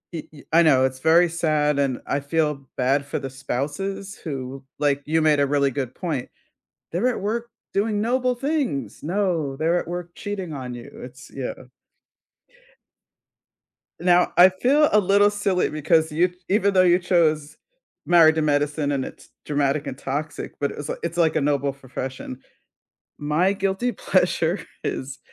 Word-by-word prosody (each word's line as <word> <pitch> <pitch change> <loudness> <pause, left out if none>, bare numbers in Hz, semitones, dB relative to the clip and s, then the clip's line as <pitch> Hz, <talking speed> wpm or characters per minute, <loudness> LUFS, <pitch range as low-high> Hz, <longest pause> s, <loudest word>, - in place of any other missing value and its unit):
I 160 - -4 0.3
i 165 - +7
I - - +6
know 135 -5 +5
it's 130 0 -3
very 165 +4 +5
sad 155 -3 +1
and 135 -3 0
I 140 - 0
feel 150 -1 -1
bad 135 +3 +1
for 140 - -3
the 135 - -5
spouses 190 +10 -4
who, 135 -3 -6 0.2
like 145 -1 +1
You 160 +2 +1
made 155 -2 +3
a 140 - +3
really 140 -1 +2
good 130 -2 -4
point. 155 -8 -3 0.6
"They're 200 +9 +1
at 250 - -2
work 230 +4 -2 0.2
doing 205 +1 0
noble 250 +2 +1
things." 270 - -2
No, 165 -5 -1
they're 165 +4 +1
at - - -8
work 175 0 -5
cheating 195 -5 -5
on 130 -3 -6
you. 120 -1 -9
It's 125 +1 -11
Yeah. 135 -2 -4 2.5
Now, 180 0 +3
I 180 +2 +9
feel 270 +11 +3
a 210 - +6
little 200 +1 +4
silly 205 -3 0
because 160 +1 +2
you 175 +4 +1 0.2
even 200 0 +2
though 185 - +6
you 175 -1 +5
chose 155 -5 +1 0.5
Married 165 -2 +6
to 160 - 0
Medicine, 145 0 +1
and 135 -2 -1
it's - - -11 0.2
dramatic 145 0 0
and 135 -2 -5
toxic, 145 +4 -4
but 140 - 0
it's, 145 0 -7
like - - -4
it's, 170 0 -3
like, 165 -2 +2
a - - +3
noble 140 -1 +1
profession. 130 -1 -7 0.8
My 150 +6 +1
guilty 195 +5 -1
pleasure 180 -3 +1 0.2
is 135 +1 -4
155 Hz, 165 wpm, -23 LUFS, 140-185 Hz, 2.5 s, I